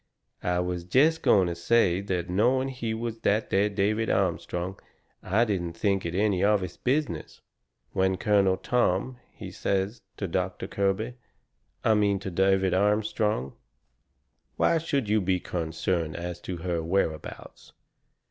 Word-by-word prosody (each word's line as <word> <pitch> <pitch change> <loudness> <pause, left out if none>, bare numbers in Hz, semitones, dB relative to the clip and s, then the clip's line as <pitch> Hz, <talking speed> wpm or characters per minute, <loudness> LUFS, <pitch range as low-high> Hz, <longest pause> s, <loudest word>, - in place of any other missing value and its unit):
I 90 0 0
was 90 -1 -3
jest 150 - +3
going 95 -2 +4
to 85 - -2
say 90 +1 +2
that 90 -3 -2
not 90 - -4
knowing 130 +6 +2
he 120 -4 -4
was 115 0 -4
that 110 0 0
there 100 +2 +3
David 105 +3 0
Armstrong 90 0 -1 0.4
I 105 +6 +2
didn't 90 -6 -2
think 95 0 0
it 85 - -4
any 100 -2 +2
of 105 -1 +3
his 90 -2 -5
business, 130 - -2 0.5
when 95 0 +1
Colonel 100 -1 +3
Tom, 120 +2 0
he 95 -4 -9
says 100 +3 -1 0.2
to 100 - -3
Doctor 90 +1 -2
Kirby 100 +5 -1 0.7
I 110 - +4
mean 105 -2 +2
to 95 0 -6
David 95 +1 +2
Armstrong: 105 - +1 1.0
"Why 165 - +3
should 140 -7 -1
you 105 +1 +2
be 95 0 +1
concerned 80 -1 -2
as 85 0 -5
to 90 0 -5
her 85 -1 -2
whereabouts? 80 -2 -3
95 Hz, 150 wpm, -27 LUFS, 90-110 Hz, 1.0 s, going